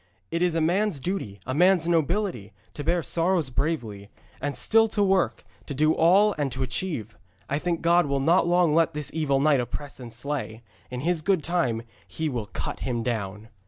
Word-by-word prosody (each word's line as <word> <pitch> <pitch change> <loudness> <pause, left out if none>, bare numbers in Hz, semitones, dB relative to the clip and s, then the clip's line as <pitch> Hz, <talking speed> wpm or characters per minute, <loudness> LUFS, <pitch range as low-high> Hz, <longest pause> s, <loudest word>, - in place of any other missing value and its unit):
It 170 - -1
is 175 -2 +2
a 165 - +1
man's 180 +1 +1
duty, 130 - -4
a 130 - -3
man's 175 +2 +4
nobility, 170 - 0 0.2
to 145 - -6
bear 170 +2 +1
sorrows 165 -4 0
bravely, 115 -9 -2 0.3
and 145 0 -2
still 225 0 +4
to 210 -1 0
work, 195 -2 +1 0.2
to 145 - -5
do 155 +3 +3
all 195 +6 +4
and 140 -2 0
to 130 +1 -2
achieve. 125 - -4 0.3
I 145 - -1
think 170 0 -2
God 170 -1 +4
will 140 0 0
not 170 +6 +3
long 175 -3 +3
let 165 -1 +2
this 150 -1 -3
evil 145 -4 +1
knight 145 -1 +4
oppress 135 +4 -5
and 120 -2 -9
slay. 120 -2 -4 0.3
In 125 0 -5
His 170 +1 0
good 185 -2 +1
time 135 -10 0 0.2
He 160 -1 -3
will 120 -6 -4
cut 95 - -5
him 120 -3 -2
down.' 110 -2 -4
155 Hz, 195 wpm, -26 LUFS, 125-175 Hz, 0.3 s, man's